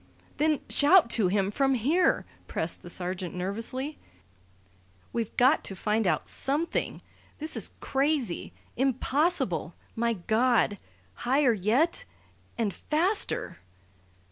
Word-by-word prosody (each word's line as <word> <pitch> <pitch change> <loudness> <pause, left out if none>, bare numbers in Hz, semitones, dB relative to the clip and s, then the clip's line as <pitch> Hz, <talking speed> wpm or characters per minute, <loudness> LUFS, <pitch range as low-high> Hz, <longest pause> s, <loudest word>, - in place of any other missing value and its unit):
"Then 305 -1 +2
shout 295 -3 +5
to 215 -5 +3
him 195 +1 +1
from 270 +4 +2
here," 300 +10 +2 0.2
pressed 160 +1 -1
the 175 - -10
sergeant 180 0 -4
nervously. 230 +10 -3 1.1
"We've 230 -2 -3
got 260 +5 +4
to 195 - -4
find 210 +2 0
out 155 -4 0
something! 295 +5 -2 0.3
This 310 +1 -4
is - - 0
crazy 270 - -1 0.2
impossible! 275 +6 0 0.2
My 235 0 +1
God! 220 +1 +1 0.3
Higher 255 - +2
yet 250 - +1 0.5
and 220 -5 0
faster!" 350 - 0
245 Hz, 110 wpm, -28 LUFS, 205-295 Hz, 1.1 s, shout